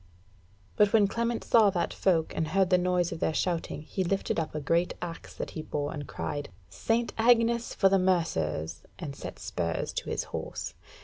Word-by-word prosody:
But 210 0 +4
when 210 -3 +6
Clement 235 +3 -1
saw 220 -3 +5
that 180 -3 -1
folk, 170 -4 +1
and 160 - 0
heard 190 +2 +2
the 180 - +6
noise 180 -1 +1
of - - -5
their 160 - 0
shouting 165 -1 -1
he 190 +4 -2
lifted 195 -1 0
up 155 -1 -3
a - - 0
great 165 +4 +1
axe 170 -1 -7
that - - -5
he 160 - -5
bore 145 -1 -3
and 145 -2 -6
cried, 145 -1 -4 0.2
"St. 230 - 0
Agnes 235 0 +3
for 195 - +5
the 195 0 +4
Mercers!" 80 - 0 0.2
and 150 -6 -6
set - - -7
spurs 85 -1 -2
to - - -4
his - - -1
horse. - - -4
175 Hz, 190 wpm, -29 LUFS, 155-200 Hz, 0.2 s, when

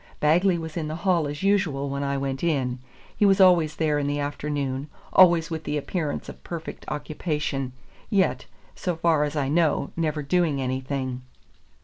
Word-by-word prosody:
Bagley 175 +4 +3
was 160 0 -6
in 160 -2 -2
the 155 - -4
hall 175 -5 +3
as 145 +4 -5
usual 190 -9 +1
when 140 0 -3
I 140 0 -1
went 135 +1 -3
in. 130 -7 0 0.4
He - - 0
was 195 -1 +5
always 175 -5 +5
there 150 -2 +1
in 145 - -1
the 145 0 -1
afternoon, 145 -1 -3 0.3
always 170 -3 +6
with 160 -1 -3
the 150 0 -2
appearance 150 0 -3
of - - -10
perfect 165 -2 -7
occupation, 150 -3 -3 0.4
yet, 185 - +1 0.3
so 180 -3 -2
far 160 -2 +2
as 150 +1 -4
I 145 -3 0
know, 155 -1 +1
never 155 -2 -1
doing 155 -1 +1
anything. 130 0 -3
150 Hz, 170 wpm, -25 LUFS, 140-170 Hz, 0.4 s, always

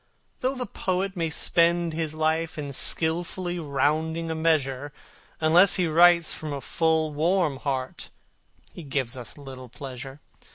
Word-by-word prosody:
Though 260 +2 -1
the 250 -1 -3
poet 190 -1 -2
may 165 -2 -1
spend 170 +1 +2
his 155 -1 -2
life 160 +1 0
in 145 -2 -5
skilfully 175 +4 0
rounding 160 +3 -1
a - - 0
measure, 145 -4 0 0.5
Unless 170 +4 +5
he 180 - +1
writes 170 +1 +5
from 155 -1 -6
a 140 - -3
full, 160 +2 0
warm 165 -1 +1
heart 130 -2 -4 0.6
he - - -9
gives 135 -5 -2
us 125 0 -6
little 130 -3 -10
pleasure. 135 +2 -8
160 Hz, 140 wpm, -25 LUFS, 140-170 Hz, 0.6 s, Unless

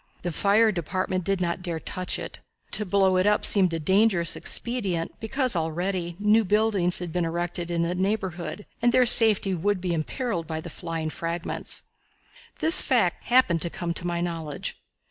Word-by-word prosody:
The 175 - -2
Fire 210 +6 +3
Department 185 +1 -3
did 195 +1 -1
not 175 0 -2
dare 170 -3 -4
touch 185 +3 -3
it. - - -7 0.3
To 210 - +3
blow 190 0 +2
it 185 +2 +2
up 210 0 +2
seemed 190 -4 +5
a 165 - -2
dangerous 190 +1 +2
expedient, 195 -9 -1
because 255 0 0
already 170 +2 -3
new 210 +2 +3
buildings 205 -3 +1
had 175 -2 -6
been 180 - 0
erected 175 +1 -4
in 170 -1 -1
its 180 +2 -3
neighborhood, 190 -1 -3 0.2
and 240 +1 +3
their 255 +1 +4
safety 220 -4 +6
would 190 +3 -1
be 180 -1 -2
imperiled 170 - -3
by 160 -1 -4
the 170 +1 -9
flying 165 -2 -5
fragments. 170 +1 -3 0.7
The 320 - 0
fact - - +4
happened 240 -10 +3
to 170 - -1
come 170 0 -4
to 175 - -4
my 170 0 -2
knowledge. 165 -4 -5
180 Hz, 175 wpm, -25 LUFS, 170-205 Hz, 0.7 s, safety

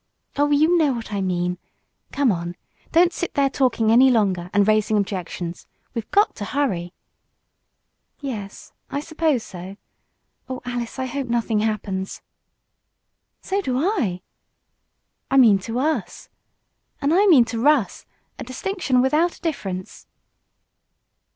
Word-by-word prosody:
"Oh, 290 +1 +2
you 310 +4 +4
know 295 -4 +3
what 230 -3 -6
I 200 - -1
mean. 180 -1 -1 0.5
Come 275 -4 +2
on. 175 -1 -4 0.4
Don't 345 +1 +4
sit 350 - -4
there 275 -1 +2
talking 235 -5 +2
any 255 +3 +7
longer, 195 -7 +1
and 205 0 +3
raising 215 0 +3
objections. 180 -3 -4 0.3
We've 230 -3 -5
got 410 +1 +3
to 205 - -4
hurry." 195 -11 -1 1.3
"Yes, 215 -8 -7 0.2
I 280 - -2
suppose 315 -5 0
so. 185 +1 -9 0.7
Oh, 255 -1 -4
Alice, 245 -2 -4
I 260 - -2
hope 270 +1 -4
nothing 230 -2 0
happens!" 205 -3 -3 1.2
"So 395 +1 -1
do 255 -9 -1
I." 270 - 0 1.1
"I 270 - +2
mean 220 -7 +6
to 225 +5 -5
us." 305 +5 -2 0.7
"And 285 +3 +1
I 400 +4 +4
mean 280 -11 +7
to 230 0 -4
Russ. 285 -5 +2 0.3
A - - -4
distinction 270 -1 -1
without 310 +6 +2
a - - -24
difference." 195 - -5
245 Hz, 135 wpm, -22 LUFS, 200-290 Hz, 1.3 s, any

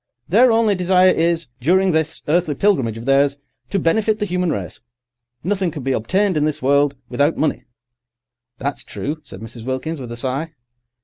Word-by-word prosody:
Their 235 +7 +5
only 225 -2 +3
desire 185 0 +4
is, 165 -2 +1
during 185 +8 +3
this 160 -1 -1
earthly 155 -1 +1
pilgrimage 135 - +1
of 115 - -8
theirs, 140 +1 +3 0.3
to 200 - 0
benefit 210 +5 +1
the 210 - -1
human 180 -2 -1
race. 95 - -5 0.6
Nothing 190 0 0
can 150 -5 -7
be 135 - -1
obtained 185 - +1
in 150 - +1
this 155 -1 -1
world 140 +1 +2
without 145 +6 +1
money—" 155 - -1 0.9
"That's 140 +3 -4
true," 150 +3 -5
said 135 - -10
Mrs. 115 +1 -9
Wilkins, 130 +5 -3
with 120 -2 -7
a 120 - -6
sigh. 135 +6 -3
160 Hz, 175 wpm, -20 LUFS, 135-185 Hz, 0.9 s, Their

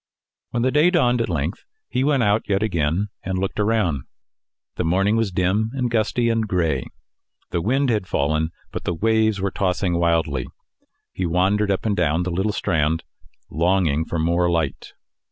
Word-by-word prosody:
When 120 -1 -1
the 130 - +2
day 150 +5 +4
dawned 125 -9 +2
at 115 - -2
length, 80 +2 -2 0.2
he 130 - -1
went 140 -3 +2
out 105 +1 +3
yet 100 +1 +2
again, 90 0 0
and 95 0 -3
looked 95 +2 -2
around. 105 - +1 0.8
The - - 0
morning 95 +6 +2
was 115 -3 0
dim 95 +5 +1
and 125 -3 -1
gusty 115 +1 +1
and 115 -1 +1
gray. 90 -5 0 0.6
The 85 - 0
wind 130 +6 +1
had 105 -4 -1
fallen, 80 +2 0 0.2
but - - -5
the 85 - -1
waves 110 +2 +2
were 95 0 -1
tossing 90 -2 0
wildly. 80 -6 +1 0.7
He 95 - -2
wandered 95 +5 +2
up 100 +2 -1
and 105 -2 +1
down 85 -1 +1
the 90 - -3
little 95 +5 0
strand, 80 -5 0 0.5
longing 85 -2 +2
for 85 - -3
more 85 +2 +2
light. 80 -5 -2
95 Hz, 170 wpm, -22 LUFS, 85-110 Hz, 0.8 s, day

